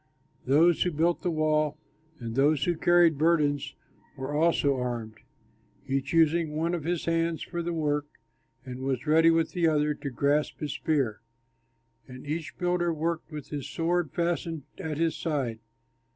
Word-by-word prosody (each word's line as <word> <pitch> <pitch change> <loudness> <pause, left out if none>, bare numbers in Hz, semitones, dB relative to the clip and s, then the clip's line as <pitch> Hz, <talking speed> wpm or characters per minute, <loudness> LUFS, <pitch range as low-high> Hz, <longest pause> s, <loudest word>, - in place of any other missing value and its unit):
Those 160 +5 +4
who 180 - +3
built 165 +3 +1
the 180 - -1
wall 155 -2 +1 0.4
and 115 -2 -5
those 140 +3 +3
who 175 - +1
carried 170 -2 +4
burdens 150 -3 +1 0.4
were 135 +2 -4
also 150 -3 +2
armed, 120 -3 -4 0.7
each 135 0 -1
using 165 -1 +2
one 165 +2 0
of 165 -4 -3
his 175 -1 -1
hands 165 -1 0
for 170 -1 -4
the 170 +1 -3
work, 150 -3 -1 0.6
and 125 -1 -7
was 130 0 -2
ready 160 +2 +5
with 165 0 +2
the 175 -3 +1
other 150 -1 +2
to 145 -1 -6
grasp 140 +4 0
his 150 -2 -3
spear. 140 -8 -1 0.9
And 130 +1 -11
each 155 +2 -4
builder 175 -1 0
worked 165 +1 -3
with 150 -3 -7
his 145 -3 -5
sword 170 -1 0
fastened 170 -2 -2 0.2
at 160 -5 -4
his 165 -1 +1
side. 135 -9 -2
155 Hz, 160 wpm, -28 LUFS, 140-165 Hz, 0.9 s, ready